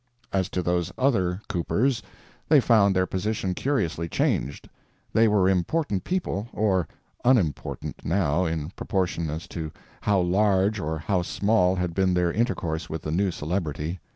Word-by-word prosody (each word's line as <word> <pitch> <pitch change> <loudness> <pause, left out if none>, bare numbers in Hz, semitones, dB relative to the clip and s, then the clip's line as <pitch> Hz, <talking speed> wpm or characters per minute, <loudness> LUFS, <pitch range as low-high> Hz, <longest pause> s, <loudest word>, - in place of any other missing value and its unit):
As 95 -2 +1
to 90 - -2
those 85 -1 0
other 100 -8 +1
coopers, 115 +8 0 0.5
they 150 -2 +7
found 110 -6 +4
their 95 0 +3
position 95 0 -2
curiously 85 - -1
changed—they 95 - -1
were 105 -3 +3
important 95 - 0
people, 120 - -2
or 95 -5 +1 0.4
unimportant, 105 - 0
now, 85 -1 +1
in 80 -1 -2
proportion 90 -5 -2
as 80 +3 -5
to 80 -3 -5 0.3
how 100 -2 +2
large 95 +3 +2
or 80 -1 -2
how 90 +4 0
small 95 0 +2
had 90 -2 -2
been 95 0 +2
their 90 -1 +2
intercourse 85 -7 -1
with 80 0 -5
the 75 - -3
new 95 +4 +1
celebrity. 80 0 -3
95 Hz, 145 wpm, -25 LUFS, 85-105 Hz, 0.5 s, they